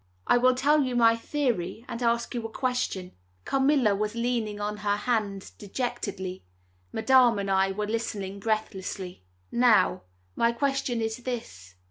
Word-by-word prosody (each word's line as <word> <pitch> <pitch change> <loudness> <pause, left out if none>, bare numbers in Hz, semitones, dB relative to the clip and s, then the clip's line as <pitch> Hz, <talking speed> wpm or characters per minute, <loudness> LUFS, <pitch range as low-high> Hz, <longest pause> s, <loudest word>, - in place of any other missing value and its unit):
I 245 - +4
will 255 +1 +4
tell 295 +4 +3
you 255 -3 -1
my 230 -1 +5
theory 230 - -2
and 230 - -6
ask 235 0 +1
you 240 -2 -3
a - - -16
question." 250 -8 -2 0.3
Carmilla 270 -5 +3
was 210 +2 -2
leaning 235 -3 -1
on 210 0 -3
her 205 -1 0
hand 210 -4 -2
dejectedly; 200 -4 -4 0.5
Madame 245 0 +4
and 200 -1 -2
I 190 0 +3
were 210 +2 -2
listening 205 -3 -3
breathlessly. 195 - -3 0.3
"Now, 240 -2 +4 0.3
my 235 0 +2
question 270 -2 -1
is 225 +1 -2
this. 160 - -6
225 Hz, 145 wpm, -27 LUFS, 200-245 Hz, 0.5 s, my